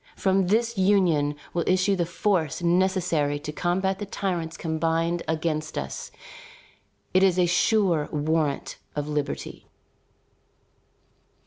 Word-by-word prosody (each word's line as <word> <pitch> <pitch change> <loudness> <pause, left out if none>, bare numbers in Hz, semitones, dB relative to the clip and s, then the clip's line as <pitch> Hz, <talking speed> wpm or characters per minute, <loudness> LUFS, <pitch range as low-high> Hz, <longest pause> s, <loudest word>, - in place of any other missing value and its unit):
From 190 -1 +2
this 230 +2 +1
union 175 -7 +3 0.2
will 170 - 0
issue 185 +2 +3
the 175 -3 -1
force 175 -3 0
necessary 170 -5 +1
to 150 +1 -6
combat 190 +4 -1
the 205 - -5
tyrants 175 -5 -3
combined 165 +1 0
against 155 -1 -2
us. 70 - -5 1.0
It 185 - +5
is 190 -2 +4
a 180 - +4
sure 175 -3 +2
warrant 150 -1 -1 0.2
of 145 0 -2
liberty." 150 -1 -4
170 Hz, 115 wpm, -25 LUFS, 155-190 Hz, 1.0 s, It